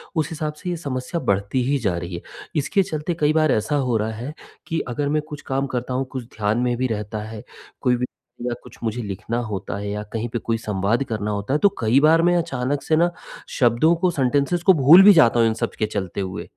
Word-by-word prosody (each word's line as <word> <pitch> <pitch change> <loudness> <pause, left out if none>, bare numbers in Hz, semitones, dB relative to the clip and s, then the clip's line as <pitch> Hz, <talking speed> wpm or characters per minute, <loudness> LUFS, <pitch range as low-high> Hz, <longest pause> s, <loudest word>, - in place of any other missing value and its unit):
उस 160 0 0
हिसाब 155 -2 -3
से 180 +4 -7
ये 175 - -1
समस्या 135 +1 -4
बढ़ती 100 +6 +1
ही 140 +1 +2
जा 90 - 0
रही 85 0 -5
है, 85 - -6 0.3
इसके 155 +6 +2
चलते 155 0 -3
कई 150 0 +3
बार 155 -2 +3
ऐसा 110 +7 0
हो 115 - +2
रहा 110 +1 -1
है 120 +7 -6 0.3
कि 165 - -1
अगर 140 +4 -2
मैं 155 0 +1
कुछ 150 -1 -7
काम 135 0 -1
करता 125 +1 -2
हूँ, 130 +1 -1
कुछ 130 -3 -5
ध्यान 105 +1 +1
में 125 0 +1
भी 130 0 0
रहता 105 -1 -4
है, 110 0 -8 0.4
कोई 125 - +3
भी 125 +1 -1
बात - - -19 0.3
या 120 - -1
कुछ - - -14
मुझे 115 +1 -2
लिखना 105 +3 -4
होता 100 0 -4
है 100 0 -4
या 105 +1 -3
कहीं 115 +1 -2
पे 120 - -3
कोई 115 0 -1
संवाद 105 +3 0
करना 105 -1 -2
होता 105 +6 -2
है, 150 - +2
तो 200 - +5
कई 115 +4 +3
बार 160 +2 +5
मैं 175 +1 +3
अचानक 145 -4 -1
से 160 - +2
ना 170 +2 +3 0.4
शब्दों 125 +7 +3
को, 175 +2 +1
सेंटेंसेस 145 +4 +1
को 190 - +7
भूल 160 +5 +8
भी 205 +1 +9
जाता 120 -8 +5
हूँ 115 - +5
इन 110 - +1
सब - - 0
के 110 - +2
चलते 100 -2 -4
हुए, 95 -1 -4
125 Hz, 245 wpm, -22 LUFS, 110-155 Hz, 0.4 s, भी